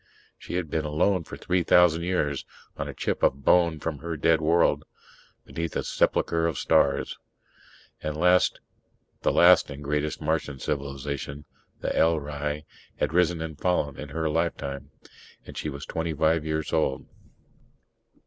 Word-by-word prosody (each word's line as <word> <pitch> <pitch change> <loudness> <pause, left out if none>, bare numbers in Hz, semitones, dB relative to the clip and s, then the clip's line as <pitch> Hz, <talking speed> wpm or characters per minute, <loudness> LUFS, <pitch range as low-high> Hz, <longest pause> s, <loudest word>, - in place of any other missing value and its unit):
She - - -6
had 90 -2 -1
been 80 - 0
alone 80 +4 +1
for - - -8
three 90 0 0
thousand 85 -1 +5
years, 85 -6 -1 0.3
on - - -4
a - - -6
chip - - -2
of 70 0 +1
bone 85 -3 +4
from 75 -2 -4
her 85 +1 -4
dead 80 +1 +3
world 80 +2 +3 0.6
beneath 85 -1 -4
a - - -1
sepulchre 85 0 +1
of 80 -5 -2
stars. 70 -1 +2 0.8
The 75 - -2
last 90 +4 +3 1.1
and 70 0 -8
greatest 75 +1 -1
Martian 75 -2 -1
civilization, 70 +1 -4 0.4
the - - -1
L'hrai, 75 -2 0 0.3
had - - 0
risen 85 -2 +2
and 80 -2 -7
fallen 80 -6 +1
in 75 - -7
her 80 +2 -2
lifetime. 70 -4 -2 0.6
And - - -11
she 75 - -3
was 70 0 -7
twenty 80 -1 -3
five 80 +1 +2
years 80 -1 -2
old. 65 - 0
80 Hz, 145 wpm, -26 LUFS, 70-85 Hz, 1.1 s, thousand